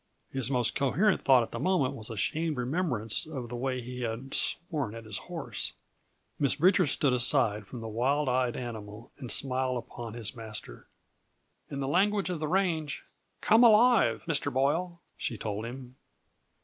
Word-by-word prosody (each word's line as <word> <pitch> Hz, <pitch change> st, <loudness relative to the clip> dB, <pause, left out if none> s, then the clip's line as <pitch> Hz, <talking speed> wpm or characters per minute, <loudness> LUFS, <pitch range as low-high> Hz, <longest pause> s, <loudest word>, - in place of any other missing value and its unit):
His 135 Hz, -1 st, 0 dB
most 125 Hz, -3 st, +1 dB
coherent 170 Hz, +10 st, +2 dB
thought 130 Hz, -3 st, +5 dB
at -, -, -8 dB
that -, -, -5 dB
moment 180 Hz, -9 st, +1 dB
was 110 Hz, -1 st, -5 dB
a 115 Hz, -, -6 dB
shamed 155 Hz, -, 0 dB
remembrance 125 Hz, -, -1 dB
of 130 Hz, -7 st, -6 dB
the 120 Hz, -, -5 dB
way 130 Hz, +1 st, -2 dB
he 125 Hz, +1 st, -7 dB
had 120 Hz, +3 st, -4 dB
sworn 155 Hz, -, -1 dB
at 115 Hz, -1 st, -9 dB
his 110 Hz, -2 st, -4 dB
horse. -, -, -3 dB, 0.7 s
Miss 140 Hz, -2 st, +3 dB
Bridger 180 Hz, +3 st, +4 dB
stood 140 Hz, -1 st, +3 dB
aside 120 Hz, -5 st, +2 dB
from 125 Hz, -, -8 dB
the 115 Hz, -, -5 dB
wild 135 Hz, +7 st, 0 dB
eyed 125 Hz, -1 st, +1 dB
animal 110 Hz, -2 st, -7 dB
and 125 Hz, -4 st, -5 dB
smiled 130 Hz, -1 st, +1 dB
upon 115 Hz, -1 st, -7 dB
his 115 Hz, 0 st, -4 dB
master. 110 Hz, -, -7 dB, 0.8 s
"In 140 Hz, -1 st, -4 dB
the 135 Hz, -, -2 dB
language 195 Hz, +4 st, +2 dB
of 170 Hz, -, -3 dB
the 155 Hz, -, -2 dB
range, 165 Hz, -4 st, 0 dB, 0.4 s
'come 225 Hz, +3 st, +5 dB
alive,' 235 Hz, +1 st, +5 dB
Mr. 145 Hz, -3 st, +1 dB
Boyle," 165 Hz, +7 st, 0 dB, 0.2 s
she 115 Hz, -, -3 dB
told 105 Hz, +1 st, -4 dB
him. 125 Hz, +1 st, -8 dB
130 Hz, 170 wpm, -29 LUFS, 115-160 Hz, 0.8 s, thought